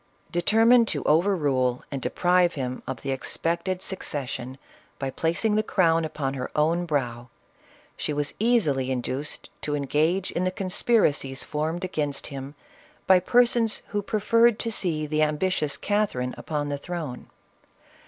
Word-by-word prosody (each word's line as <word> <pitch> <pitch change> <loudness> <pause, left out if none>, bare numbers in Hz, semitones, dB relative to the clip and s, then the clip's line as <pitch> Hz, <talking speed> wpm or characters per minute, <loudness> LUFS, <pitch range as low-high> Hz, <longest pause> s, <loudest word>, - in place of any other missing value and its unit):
Determined 225 +6 +4
to - - -1
over 175 +6 +3
rule 130 -6 0
and 135 -2 -4
deprive 180 +2 +2
him 130 -2 -4
of 130 -3 -5
the 135 - -2
ex 135 - -1
pected 175 +3 -1
succession 135 -9 -4 0.4
by 135 -1 -3
placing 170 - 0
the 215 - +3
crown 165 -6 +2
upon 150 -4 -3
her 130 -2 -4
own 165 +3 +1
brow, 120 -5 -2 0.7
she - - -3
was 145 0 -1
easily 180 - +2
induced 130 +3 -4
to 145 - -2
engage 155 +6 0
in 175 - -1
the 185 - +1
conspira 195 +2 +2
cies 135 -2 -4
formed 160 +4 -3
against 150 -6 -2
him 135 +2 -7 0.5
by 185 -1 +6
persons, 235 +2 +3
who 205 - -1
preferred 230 +2 +3
to 230 - -2
see 165 -7 0
the 155 +1 0
ambitious 155 0 0
Catherine 200 -12 -1
upon 145 -2 -3
the 145 -1 -3
throne. 160 -6 -6
155 Hz, 150 wpm, -25 LUFS, 140-190 Hz, 0.7 s, by